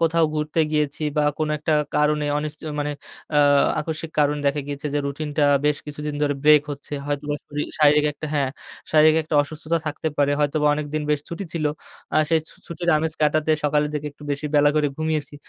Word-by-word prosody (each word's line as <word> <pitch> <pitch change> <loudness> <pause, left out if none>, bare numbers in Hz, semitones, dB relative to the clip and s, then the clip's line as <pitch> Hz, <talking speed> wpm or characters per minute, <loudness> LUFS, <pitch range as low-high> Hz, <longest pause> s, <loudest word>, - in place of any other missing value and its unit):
কোথাও 165 0 +3
ঘুরতে 150 +1 0
গিয়েছি 150 0 -1
বা 150 - +3 0.2
কোনো 155 -1 0
একটা 155 +1 -1 0.2
কারণে 150 0 +2
অনিশ্চ 150 0 -5 0.2
মানে 145 0 -1 0.4
আ - - +6 0.4
আকস্মিক 160 +1 -5
কারণ 150 0 +2
দেখা 140 +1 +1
গিয়েছে 145 +1 -5
যে - - +2
রুটিনটা 145 +1 -1 0.2
বেশ 150 -1 +2
কিছুদিন 150 0 -5
ধরে 145 -1 +1
ব্রেক 150 -1 +7
হচ্ছে। 140 +1 -11
হয়তোবা 145 0 -2
শরীর 145 0 -4
শারীরিক 150 0 +5
একটা 155 +2 -7
হ্যাঁ, 140 -3 +1 0.4
শারীরিক 155 0 +6
একটা 155 - -4
অসুস্থতা 155 +3 -3
থাকতে 155 +1 -2
পারে, 145 0 +3
হয়তোবা 150 +1 +1
অনেকদিন 150 0 -3
বেশ 150 - +2
ছুটি 170 +4 -5
ছিল। 160 -3 -2 0.5
আ - - +4
সেই 160 -1 +4
ছু - - -15
ছুটির 175 +1 -2
আমেজ 160 0 -1
কাটাতে 155 +1 +2
সকালের 150 0 +2
দিকে 150 0 -3
একটু 145 - -17
বেশি 145 +2 -3
বেলা 145 0 +5
করে 150 -1 +3
ঘুমিয়েছি। 155 -2 -2
150 Hz, 190 wpm, -23 LUFS, 145-155 Hz, 0.5 s, ব্রেক